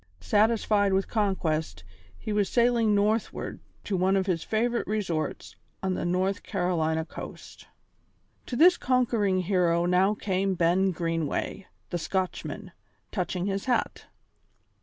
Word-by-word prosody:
Satisfied 210 - +2
with 190 0 +1
conquest, 160 - -1 0.3
he 215 - -4
was 205 -2 +1
sailing 235 -3 +3
northward 210 +2 -1 0.2
to 205 - -2
one 190 +1 +2
of 190 -1 +1
his 180 -4 0
favourite 235 +2 0
resorts 185 -7 -3 0.3
on 190 -1 0
the 180 - -3
North 185 +3 0
Carolina 160 -4 -1
coast. - - -10 0.8
To 245 - -4
this 350 +6 +6
conquering 230 -7 +1
hero 175 -2 +2
now 185 +4 +3
came 195 -1 -1
Ben 180 +3 +3
Greenway, 165 +1 -2 0.2
the 175 - -1
Scotchman, 185 +3 -3 0.4
touching 180 -1 -2
his 195 0 -2
hat. 250 -2 -1
190 Hz, 125 wpm, -27 LUFS, 175-210 Hz, 0.8 s, this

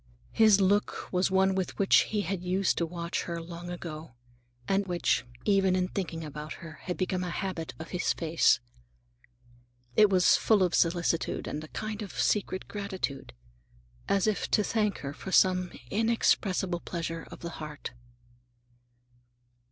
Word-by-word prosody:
His 215 -3 +5
look 200 +1 +1
was 180 +1 +2
one 190 0 +3
with 190 -1 -2
which 195 - +5
he 210 -1 0
used 185 +1 0
to 170 - 0
watch 170 0 -3
her 170 -1 -4
long 170 +1 -8
ago, 160 -5 -7 0.5
and 195 0 +1
which, 175 -7 +1 0.2
even 195 -2 +3
in 180 0 0
thinking 165 -4 -4
about 150 +1 -6
her, 165 -4 -11
had 180 - -3
become 185 -1 -1
a 180 - -3
habit 170 -1 -4
of 160 - -8
his 180 0 0
face. 165 0 +3 1.4
It 210 -1 +6
was 185 -2 +5
full 210 -4 +3
of 180 - +1
solicitude, 170 -1 +1
and 150 - -4
a - - -8
kind 215 +5 -5
of 205 - -6
secret 190 -2 0
gratitude, 190 - -4 0.8
as 195 -2 +3
if 215 -2 0
to 210 - +3
thank 210 -2 0
her 140 0 -5
for 190 - -8
some 185 -1 +4 0.2
inexpressible 200 -5 +1
pleasure 165 -1 -5
of - - -11
the 170 - -5
heart. 150 -4 -7
180 Hz, 150 wpm, -29 LUFS, 170-195 Hz, 1.4 s, It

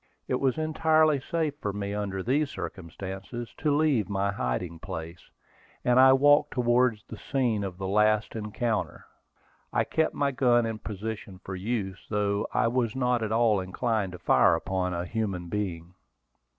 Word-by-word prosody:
It 125 - 0
was 135 0 +1
entirely 155 -1 +3
safe 155 +2 -1
for 105 - -1
me 100 0 -4
under 100 -2 -3
these 140 +6 +1
circumstances 95 - -7
to 150 - +1
leave 145 - +2
my 100 0 0
hiding 85 +1 -3
place, 85 -2 -7 0.6
and 125 +1 +4
I 130 0 +8
walked 145 +2 +4
towards 120 -3 +2
the - - -10
scene 125 -8 0
of 95 -2 -5
the 95 - -5
last 105 +3 +2
encounter. 110 +1 -2 0.7
I - - +2
kept 160 0 0
my 140 -1 +1
gun 120 -2 +3
in 110 -1 -3
position 105 -2 -6
for 95 - -5
use, 95 -1 -3
though 105 -1 0
I - - +2
was 120 -1 0
not 125 -2 +1
at 110 -1 -2
all 110 -2 +3
inclined 100 +1 -1
to - - -7
fire - - +4
upon 95 -1 -2
a 85 +1 -3
human 95 -4 -3
being. 90 -4 -4
110 Hz, 165 wpm, -27 LUFS, 95-125 Hz, 0.7 s, I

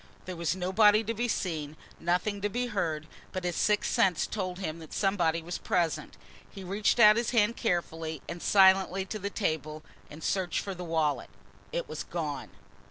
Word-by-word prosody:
There 185 - -5
was 170 0 -1
nobody 205 +4 +4
to 225 +1 -2
be 240 +2 -1
seen, 155 -8 -3 0.2
nothing 180 +4 0
to 205 - 0
be 245 +4 -1
heard, 165 -9 -2 0.3
but 185 - -4
his 175 -1 -1
sixth 210 -1 +1
sense 185 -4 +3
told 185 -4 -4
him 165 -4 -4
that 160 -2 -11
somebody 170 -5 +1
was 175 +2 -5
present. 170 -3 -1 0.3
He 195 - -10
reached 200 +5 +1
out 215 -1 +8
his 235 -1 0
hand 230 -1 +3
carefully 165 - -2
and 170 0 -6
silently 190 -1 +4
to 215 +3 -5
the 200 +1 -3
table 155 -6 -2 0.3
and 150 +1 -11
searched 185 -2 0
for 195 - -5
the 180 -1 -7
wallet. 160 -3 0 0.4
It - - -3
was - - -5
gone! - - -4
185 Hz, 180 wpm, -29 LUFS, 165-210 Hz, 0.4 s, out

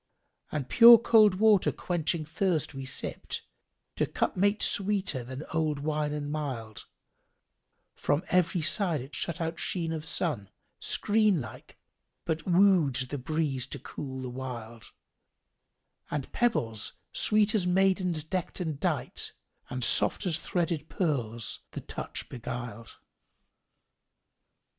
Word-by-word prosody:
And 145 -4 -3
pure 235 - +10
cold 215 -3 +5
water 210 -1 +4
quenching 165 -2 -2
thirst 165 -1 -1
we 135 -1 -6
sipped: - - -3 0.2
* - - -52
To - - +1
cup - - -1
mate 205 +3 +2
sweeter 195 -10 +1
than 130 +4 -7
old 155 -2 0
wine 150 +1 -1
and 145 -1 -4
mild: 130 -8 -5 1.1
From 145 +5 0
every 175 -2 +2
side 170 - +2
it 135 +3 -11
shut 170 0 -3
out 165 0 -3
sheen 165 -3 -1
of 155 -1 -4
sun 155 - -1 0.2
* - - -48
Screen 210 -4 +2
like, 125 - -10 0.5
but 160 +3 -2
wooed 180 -6 +4 0.2
the 145 - -3
breeze 140 -1 -1
to - - -6
cool 130 0 -7
the 125 - -4
wild: 120 -4 -7 1.2
And 145 -3 -4
pebbles, 115 - 0 0.2
sweet 215 0 +2
as 195 -5 +1
maidens 185 -3 +2
deckt 180 +4 -3
and 160 -5 -3
dight - - -1 0.2
* - - -37
And 125 0 -3
soft 200 - +3
as 170 -3 +2
threaded 165 -3 -2
pearls, 120 - -2
the - - -5
touch - - -6
beguiled." 120 -1 -7
155 Hz, 135 wpm, -29 LUFS, 130-185 Hz, 1.2 s, pure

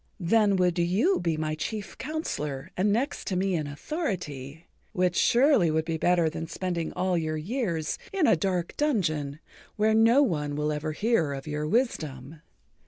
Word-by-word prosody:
Then 205 +3 +3
would 180 -2 +2
you 195 - +2
be 165 -3 -1
my 155 0 -1
chief 195 +5 -5
counsellor 150 - -4
and 200 +3 +2
next 250 +7 -1
to 190 - -1
me 190 +1 +1
in 155 -4 -1
authority, 160 - -5 0.3
which 180 -1 +1
surely 245 - +4
would 160 0 0
be 165 -1 -2
better 175 -1 +3
than 160 +1 -4
spending 170 -1 -3
all 180 0 0
your 155 -1 -2
years 170 - -2
in 385 -5 +2
a - - +5
dark 175 0 -2
dungeon 155 - 0 0.4
where 215 +1 +2
no 230 +5 +5
one 150 - -1
will 150 +1 0
ever 150 +1 -3
hear 190 -7 +1
of 135 -1 -6
your 150 0 -3
wisdom. 155 - -2
175 Hz, 170 wpm, -27 LUFS, 155-215 Hz, 0.4 s, a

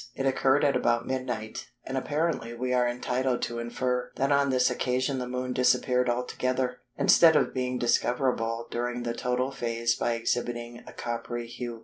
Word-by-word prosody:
It 135 - -2
occurred 135 +1 +3
at 140 -2 +3
about 120 -1 +1
midnight, 125 -3 -4 0.2
and 135 - -4
apparently 145 -4 -1
we 125 +1 -2
are 125 -1 +3
entitled 125 +1 -1
to 120 0 -3
infer 125 +1 -2
that 135 +1 0
on 140 0 +3
this 130 -1 +3
occasion 130 +1 0
the 125 - -3
Moon 125 0 -3
disappeared 125 0 +2
altogether, 125 +1 -1 0.2
instead 165 -2 +6
of - - +2
being 125 -1 -1
discoverable 120 -1 0
during 120 0 -2
the 120 -1 -2
total 125 +2 -1
phase 115 -2 0
by 120 - 0
exhibiting 120 0 -3
a - - -8
coppery 120 0 -4
hue. 120 0 -6
125 Hz, 165 wpm, -28 LUFS, 120-130 Hz, 0.2 s, instead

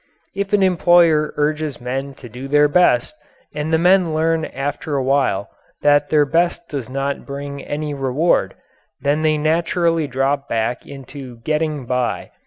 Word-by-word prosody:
If 200 0 -3
an 205 -2 +3
employer 170 -4 +4
urges 150 -1 -1
men 135 +3 -4
to 130 - -12
do 125 +4 -8
their 145 +1 +4
best, 145 - +3 0.4
and 150 +1 -3
the 160 - +4
men 175 -1 +3
learn 160 0 +1
after 145 +2 -4
a 135 - 0
while 130 -7 0 0.3
that 145 0 +4
their 150 -2 +4
best 170 +3 0
does 135 -5 -5
not 135 +1 -3
bring 140 0 -7
any 150 0 -4
reward, 140 +5 0 0.5
then 145 +2 +1
they 155 -1 +2
naturally 165 +1 +1
drop 135 +1 -1
back 115 +1 -2
into 135 -2 -10
"getting 150 0 -1
by." 125 0 -2
145 Hz, 155 wpm, -19 LUFS, 135-160 Hz, 0.5 s, employer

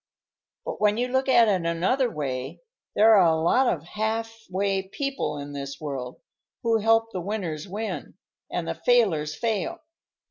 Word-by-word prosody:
"But - - -5
when 210 0 +3
you 245 +1 0
look 260 +1 +1
at 240 -3 +6
it 190 -4 +1
another 185 +11 +1
way, 140 - -4 0.4
there 220 +2 +6
are 185 -4 +6
a 160 -1 +2
lot 245 +11 +3
of 155 - -3
halfway 215 -1 -2
people 275 - -3
in 145 0 -7
this 140 -1 -6
world 135 -4 -5 0.4
who 230 -1 +3
help 225 +1 +3
the 185 - -4
winners 175 -5 -4
win, 215 +4 -5 0.3
and - - -3
the - - -1
failers 170 -12 +2
fail. 220 - -2
200 Hz, 155 wpm, -25 LUFS, 160-225 Hz, 0.4 s, at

